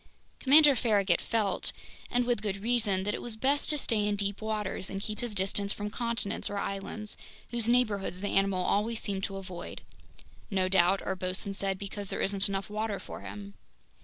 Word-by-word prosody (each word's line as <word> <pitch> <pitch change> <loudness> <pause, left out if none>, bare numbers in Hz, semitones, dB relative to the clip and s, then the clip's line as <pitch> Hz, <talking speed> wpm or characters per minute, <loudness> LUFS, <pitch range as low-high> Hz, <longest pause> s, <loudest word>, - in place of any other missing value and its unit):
Commander 290 +1 +7
Farragut 205 -7 +3
felt, 220 -4 0 0.4
and 245 0 +1
with 240 -3 +1
good 205 -2 -1
reason, 220 -5 +2
that 210 +1 -1
it - - -4
was 240 -2 -3
best 275 +5 +1
to 300 - +3
stay 220 -6 +1
in 205 - +1
deep 200 0 -1
waters 210 -3 -2
and 195 - -4
keep 215 +1 -5
his 240 -4 -3
distance 200 +1 +1
from 210 0 -4
continents 235 -4 -1
or 205 - -3
islands, 200 +2 -4 0.4
whose 235 -1 +1
neighborhoods 210 -7 +1
the 205 +1 -2
animal 195 -2 +2
always 220 +2 +1
seemed 195 -2 -3
to 195 - -5
avoid—"No 185 +1 -6
doubt," 190 +1 +4
our 190 - -1
bosun 185 +2 -2
said, 195 -1 -2
"because 200 +1 -3
there - - -4
isn't 200 0 +1
enough 195 0 -2
water 210 -1 -2
for - - -8
him!" 100 0 -8
205 Hz, 185 wpm, -30 LUFS, 195-220 Hz, 0.4 s, Commander